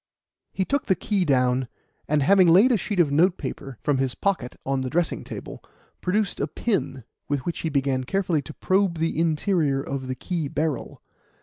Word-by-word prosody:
He 190 - -1
took 280 +6 -1
the 190 - +3
key 195 +1 0
down, 125 -3 +2 0.4
and 150 -1 +2
having 190 +4 +5
laid 195 +10 +6
a - - +4
sheet 200 0 -3
of 155 -5 +4
notepaper, 150 - 0
from 145 -3 +1
his 135 -2 -1
pocket, 185 -11 -1
on 135 0 0
the 130 - -3
dressing 170 +4 0
table, - - -8 0.4
produced 200 +1 0
a - - 0
pin, 185 - -2 0.3
with 145 -3 -1
which 170 - -3
he 160 - -2
began 135 -3 0
carefully 185 -2 0
to 155 - -10
probe 190 -2 +1
the 160 -1 -1
interior 160 -3 +1
of 135 -1 -4
the 130 - -3
key 165 +2 -3
barrel. 150 -1 -3
160 Hz, 185 wpm, -24 LUFS, 135-185 Hz, 0.4 s, laid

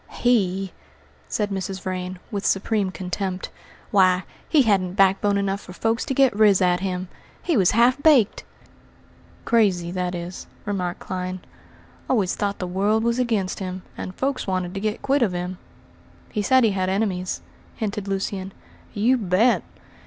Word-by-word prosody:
"He," 195 -6 +1 0.5
said 210 -1 -1
Mrs. 190 0 -3
Vrain, 185 0 -4
with 200 -2 -3
supreme 200 0 +1
contempt, 185 0 -4 0.4
"why, 185 -2 +4 0.3
he 300 -4 +5
hadn't 190 -5 +1
backbone 195 +1 +3
enough 200 0 -1
for 180 - -11
folks 225 +5 0
to 265 - -2
get 265 -5 +4
riz 205 -3 +5
at 180 -1 +3
him! 185 -1 -3 0.4
He 340 - +1
was 190 -6 +4
half 250 +4 +4
baked!" 275 -10 +4 1.0
"Crazy, 190 -7 +2
that 180 0 -2
is," 175 +1 -6 0.2
remarked 185 -4 -2
Clyne; 185 0 -4 0.7
"always 210 -8 +2
thought 200 -1 -1
the 185 - -3
world 200 +5 +1
was 235 +1 +1
against 220 -7 0
him, 185 -1 -5
and 185 - -6
folks 270 -3 -2
wanted 185 -1 -1
to 195 - -3
get 215 +2 -2
quit 275 +1 +2
of 210 -6 +2
him." 180 +1 -4 0.7
"He 210 - -1
said 260 +4 +4
he 220 - +4
had 185 -1 -1
enemies," 190 -2 -1 0.3
hinted 210 -2 -3
Lucian. 195 0 -3 0.4
"You 235 +5 +3
bet! 210 +4 +3
195 Hz, 155 wpm, -23 LUFS, 185-220 Hz, 1.0 s, he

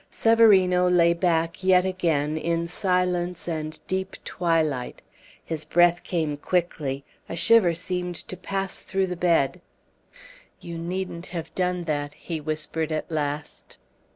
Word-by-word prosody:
Severino 190 -6 +5
lay 170 -1 +5
back 170 0 0
yet 185 -1 +5
again 160 -5 0
in 170 +1 -1
silence 180 -1 -1
and 155 -2 -4
deep 190 0 -3
twilight. 160 -7 -1 0.4
His 160 -2 -3
breath 175 +2 +3
came 160 -4 -2
quickly. 145 -5 -1 0.3
A - - -4
shiver 175 0 +4
seemed 180 +1 -3
to 185 - -8
pass 195 +1 -3
through 190 0 0
the 180 -1 -4
bed. 170 -1 +1 1.0
"You 170 -1 -7
needn't 175 0 -4
have 165 -2 -6
done 180 -1 -1
that," 145 -2 -3
he 165 -3 -5
whispered 155 +1 -2
at 155 +1 -3
last. 150 -1 -4
170 Hz, 130 wpm, -25 LUFS, 160-180 Hz, 1.0 s, Severino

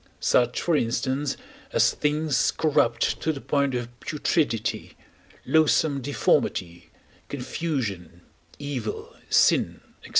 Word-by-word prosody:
such, 120 0 +2
for 170 - +1
instance, 130 +3 -1 0.3
as - - +4
things 150 -3 +1
corrupt 145 -6 +1
to 160 - +1
the 145 - -6
point 140 -1 0
of 120 -1 -2
putridity, 150 -6 -1 0.5
loathsome 155 -2 +3
deformity, 90 -10 0 0.4
confusion, 125 - -4 0.4
evil, 135 -7 -5
sin, - - +3 0.2
&c. - - -11
140 Hz, 100 wpm, -25 LUFS, 115-150 Hz, 0.5 s, as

